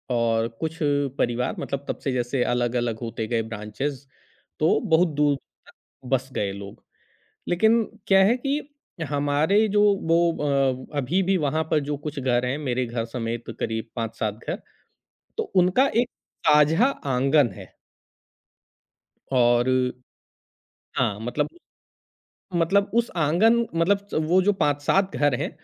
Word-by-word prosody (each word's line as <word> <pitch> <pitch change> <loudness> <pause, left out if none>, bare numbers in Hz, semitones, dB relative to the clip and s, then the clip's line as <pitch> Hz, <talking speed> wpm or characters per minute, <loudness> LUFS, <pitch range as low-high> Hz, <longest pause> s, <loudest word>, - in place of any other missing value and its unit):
और 115 -1 +1
कुछ 160 0 -3 0.4
परिवार 120 -2 0
मतलब 140 0 -4
तब - - -3
से 135 - 0
जैसे 125 0 0
अलग-अलग 120 -2 -1
होते 115 -1 -4
गए 115 0 0
ब्रांचेज़। 115 +6 -5 0.5
तो 155 - +3
बहुत 165 +2 +5
दूर 145 -1 +3 0.3
तक - - -15 0.4
बस 130 0 0
गए 100 -4 -1
लोग। 100 0 -10 0.7
लेकिन 220 +6 +3 0.2
क्या 195 -1 +5
है 230 +5 +4
कि 275 +3 -1 0.5
हमारे 145 +9 +2
जो 205 0 +3 0.3
वो 170 +1 +4 0.6
अ, - - -7
अभी 155 +8 +1
भी 190 +1 +2
वहाँ 160 +3 0
पर 155 - +3
जो 145 - -1
कुछ 150 -1 -4
घर 125 -1 +1
हैं 125 +3 -1
मेरे 130 -4 -1
घर 115 -1 -3
समेत 115 0 -4
करीब 110 0 -3
5-7 115 -2 -2
घर, - - -3 0.8
तो 450 - +1
उनका 185 +9 +4
एक 240 +1 +2 0.4
साझा 150 - +5
आँगन 140 - +2
है। 95 -2 -11 1.6
और 120 -1 +4 1.3
हाँ, 110 -5 0
मतलब 125 +6 -1
उ - - -19 1.0
मतलब 195 +5 +2
उस 235 0 +2
आँगन 175 +10 +4 0.2
मतलब 170 +5 +3
च - - -11
वो 180 +3 +4
जो 205 +2 +3
5-7 150 +6 +1
घर 145 -3 +2
हैं, - - -2
145 Hz, 140 wpm, -24 LUFS, 120-175 Hz, 1.6 s, बहुत